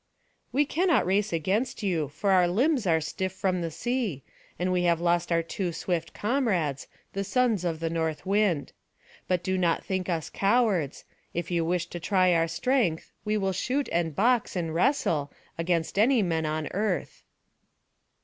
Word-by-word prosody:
"We 290 +2 +3
cannot 330 - +2
race 200 +3 +1
against 200 - -1
you, 170 -7 0
for 160 +8 -1
our 180 -2 +5
limbs 245 - +1
are 165 -2 +4
stiff 185 +4 -3
from 185 -3 -1
sea; 225 - -2 0.3
and 180 +1 0
we 180 -1 +2
have 170 -1 +3
lost 170 0 +1
our 165 0 +2
two 175 +2 -3
swift 165 0 -2
comrades, 205 - 0 0.3
the 195 - -2
sons 225 -1 +1
of 165 -3 -2
the 165 0 -1
north 160 0 -2
wind. 195 -7 +1 0.5
But 180 -2 0
do 185 0 0
not 170 -2 +1
think 185 -1 -2
us 165 -3 -2
cowards; 195 - +1 0.3
if 170 +1 -3
you 170 -1 +1
wish 170 +1 0
to 175 - -5
try 185 +1 +3
our 165 0 +2
strength, 180 -1 0
we 210 0 +1
will 195 -2 0
shoot 265 +9 -1
and 165 -3 0
box, 235 +2 +2
and 165 -3 -2
wrestle, 165 - +1 0.2
against 165 +2 -1
any 235 0 +4
men 165 -3 0
on 155 0 -2
earth." 200 -2 -2
180 Hz, 170 wpm, -27 LUFS, 165-210 Hz, 0.5 s, our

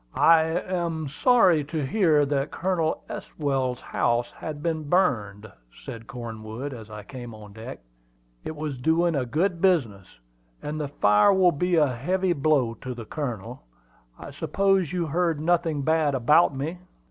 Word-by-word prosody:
"I 165 0 +6
am 170 -2 -2
sorry 180 - +4
to 155 -1 -3
hear 155 -2 +3
that 140 0 -1
Colonel 170 -3 -1
Estwell's 135 -4 -3
house 120 0 0
has 155 - -6
been 155 0 -3
burned," 110 - +1 0.3
said 115 0 -9
Cornwood, 120 +1 -7
as 110 -3 -10
I 105 -1 -8
came 120 0 -9
on 105 -1 -13
deck. 110 - -9 0.6
"It 155 - -5
was 150 -4 -5
doing 165 +5 +2
a 130 -4 -1
good 170 +7 0
business, 120 - +1 0.6
and 150 +1 -4
the 145 - -2
fire 105 - +4
will 190 -2 +4
be 180 +4 0
a 150 -5 +3
heavy 180 +9 0
blow 140 -6 +1
to 130 -1 -5
the 115 -2 -8
Colonel. 120 -8 -5 0.6
I - - -9
suppose 175 +4 +1
you 180 -2 -1
heard 165 0 0
nothing 165 -2 0
bad 155 -2 +2
about 145 +4 +4
me." 155 +6 -4
150 Hz, 155 wpm, -25 LUFS, 125-170 Hz, 0.6 s, I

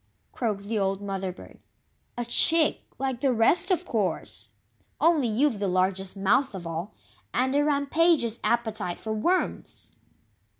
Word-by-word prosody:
croaked 210 -5 -2
the 215 +1 -2
old 195 0 0
Mother 195 -2 -3
bird, 180 - -14 0.6
"a 240 - -2
chick, 315 +6 +3 0.2
like 265 -2 -3
the 275 - +3
rest, 290 - +3
of 365 -1 +1
course! 205 - -2 0.5
Only 320 -6 +3
you've 230 +1 +1
the 200 - -1
largest 185 +1 0
mouth 215 +5 +2
of 180 -2 -7
all, 165 +5 -5 0.4
and 260 +2 +2
a 290 +1 +3
rampageous 285 -4 +2
appetite 220 -7 -1
for 220 - -4
WORMS!" 345 +13 -2
230 Hz, 140 wpm, -26 LUFS, 195-280 Hz, 0.6 s, chick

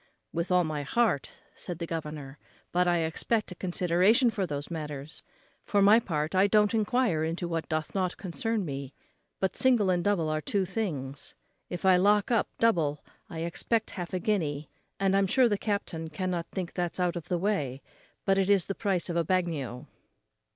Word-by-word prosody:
"With 170 +2 -2
all 180 0 +5
my 155 -2 -2
heart," 180 - +1 0.3
said 175 - -6
the 170 - -4
governor; 150 -4 -6 0.3
"but 180 +1 +2
I 175 -1 +3
expect 205 +7 -1
a - - -6
consideration 185 +7 +3
for 195 -4 -2
those 145 +1 -5
matters. 150 -2 -6 0.4
For 205 - +1
my 205 +3 +7
part, 155 -7 -2
I 190 +2 +5
don't 210 0 +3
enquire 225 -6 +1
into 165 +2 -2
what 165 -1 -3
doth 155 -1 -2
not 185 -2 -1
concern 215 +2 -2
me; 140 -2 -6 0.4
but 190 - 0
single 235 -7 +3
and 175 -1 +1
double 195 -5 +1
are 155 0 -1
two 195 +4 0
things. 150 -9 -4 0.3
If 175 +1 -5
I 185 -1 +6
lock 205 +4 +3
up 230 - +3
double 160 -10 +1 0.2
I 160 -1 -5
expect 215 +7 -1
half 175 -3 -5
a 185 - -1
guinea, 155 -8 -1 0.3
and 195 0 +2
I'm 195 0 +3
sure 255 +5 +4
the 210 - +1
captain 195 -6 -3
cannot 175 +1 -2
think 185 -3 -5
that's 175 -1 -2
out 180 -1 +1
of 170 - -6
the 180 - 0
way; 150 -9 -1 0.4
it 195 0 +3
is 200 -3 +4
but - - -12
the - - +1
price 195 -5 0
of 170 - -3
a 170 - +2
bagnio." 160 -8 -1
180 Hz, 185 wpm, -29 LUFS, 160-200 Hz, 0.4 s, my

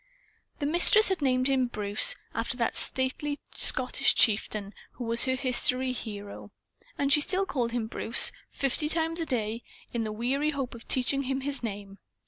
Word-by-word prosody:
The 290 - -4
Mistress 350 +8 +5
had 380 -4 -2
named 255 -2 +1
him 265 -2 +1
"Bruce," 210 -3 +3 0.2
after 230 +2 -3
the 235 - 0
stately 285 +3 -3
Scottish - - +1
chieftain 210 -2 +1 0.2
who 245 - -8
was 230 +1 +2
her 260 0 0
history 255 0 +2
hero. 205 -4 -8 0.5
And 280 0 +2
she 295 - +4
still 375 +5 0
called 245 -9 -2
him 235 -2 -2
Bruce 225 +1 +5 0.2
fifty 280 +3 -1
times 325 +1 -2
a 330 - -3
day 230 -2 -2 0.3
in 235 -1 -2
the 215 - -4
weary 260 +7 -1
hope 275 -4 -4
of 235 -1 -13
teaching 265 +2 0
him 265 0 -3
his 280 0 -3
name. 200 -3 -7
255 Hz, 170 wpm, -27 LUFS, 230-280 Hz, 0.5 s, Mistress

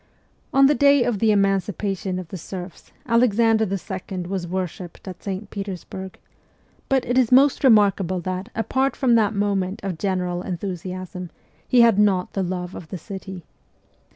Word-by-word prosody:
On 275 0 +5
the 285 - +5
daj 280 -1 +5
r - - -2
of 230 -5 0
the 225 - +3
emancipation 195 -1 0
of 180 -3 -7
the 190 - -6
serfs 180 +1 -9
Alexander 230 -2 +3
II. 190 0 -5
was 180 0 -4
worshipped 180 0 -5
at 185 -2 -8
St. 200 +1 -5
Petersburg; 190 -1 -6 0.7
but 265 -2 +2
it 245 +2 +2
is 250 -2 +2
most 270 +3 +5
remarkable 200 -6 +4
that, 185 +4 -4
apart 260 +5 0
from 255 -3 +2
that 220 -2 +3
moment 200 -1 -1
of 185 -5 -4
general 180 -3 -1
enthusiasm, 185 0 -5 0.4
he 250 - +5
had 230 -4 +5
not 195 -3 +2
the 195 - -1
love 180 0 -3
of 165 - -9
the 185 - -6
city. 190 -1 -8
195 Hz, 160 wpm, -23 LUFS, 185-225 Hz, 0.7 s, On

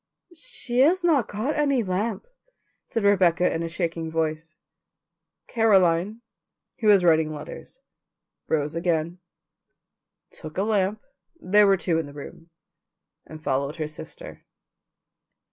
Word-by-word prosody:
"She 315 - -4
has 345 +7 +4
not 305 -9 +3
got 220 +9 -2
any 280 -5 +1
lamp," 195 +2 -2 0.6
said 225 - -2
Rebecca 180 -4 +3
in 165 - -2
a 165 - -3
shaking 165 -1 -3
voice. 160 0 -3 0.9
Caroline, 200 -2 +2 0.6
who 220 - -1
was 200 -3 +6
writing 160 -2 +3
letters, 155 - -10 0.7
rose 150 -1 -1
again, 170 0 -1 1.1
took 155 +1 -11
a 195 - +1
lamp 210 -1 0 0.4
(there 205 +3 +4
were 195 -1 +4
two 170 -3 0
in 160 - -4
the 145 - -12
room) 155 +3 -11 0.8
and 155 0 -11
followed 140 +2 -1
her 155 -2 -3
sister. 155 - -10
180 Hz, 125 wpm, -24 LUFS, 160-215 Hz, 1.1 s, was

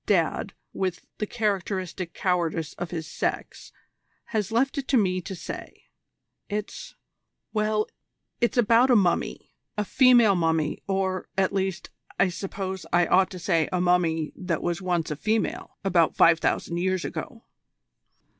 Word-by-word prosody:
Dad, - - +1 0.2
with 185 -2 -3
the 210 - -1
characteristic 190 -5 -2
cowardice 170 -4 0
of 175 -1 -3
his 160 -2 -4
sex, - - -4 0.6
has 210 -3 0
left 270 +5 +1
it 265 - -5
to 270 - +3
me 185 -4 +1
to 190 +2 -6
say. - - -9 0.6
It's 210 0 -5 0.6
well, 215 0 +1 0.5
it's 240 +1 +1
about 235 +2 +5
a 250 - +6
mummy: 185 -5 +1 0.3
a 210 - 0
female 245 -3 +6
mummy, 160 -4 0
or, 190 -1 -1
at 190 -1 +2
least, 190 -2 -2 0.3
I 185 - +4
suppose 190 +1 -5
I 175 +1 +4
ought 185 +1 +4
to 185 - -8
say 170 -3 +1
a 180 - 0
mummy 170 -3 +1
that 180 -4 -3
was 175 +1 -1
once 175 -4 -1
a - - -1
female 215 +8 -2
about 170 -4 +3
five 165 -1 +6
thousand 170 - -1
years 185 0 0
ago." 230 -3 -6
185 Hz, 145 wpm, -26 LUFS, 175-210 Hz, 0.6 s, a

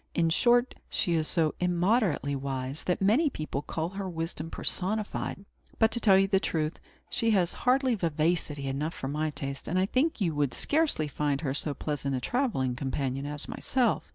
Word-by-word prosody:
In 165 -1 +2
short, 240 +7 +3 0.2
she 175 - +1
is 160 -2 +1
so 160 -3 +1
immoderately 180 - +1
wise, 135 +1 -3
that 180 +1 0
many 250 +11 +4
people 155 - -4
call 160 +2 -3
her 195 0 -5
wisdom 165 -1 -4
personified. 200 +1 -1 0.3
But, 225 -1 +4
to 235 - -2
tell 195 -5 +6
you 195 0 +4
the 195 -1 +3
truth, 155 -4 -2 0.3
she 230 -2 0
has 185 -5 +2
hardly 260 0 +2
vivacity 160 -5 0
enough 140 +5 -2
for 135 - -4
my 155 +2 -1
taste; 140 -2 -6
and 180 - 0
I 185 - +3
think 260 +9 +1
you 175 -6 +1
would 145 -3 0
scarcely 290 - +1
find 145 0 -1
her 135 -4 -1
so 145 0 -1
pleasant 140 -2 -2
a - - -1
travelling 135 - 0
companion 135 0 -2
as 150 0 -3
myself. 250 -4 0
165 Hz, 180 wpm, -29 LUFS, 145-205 Hz, 0.3 s, tell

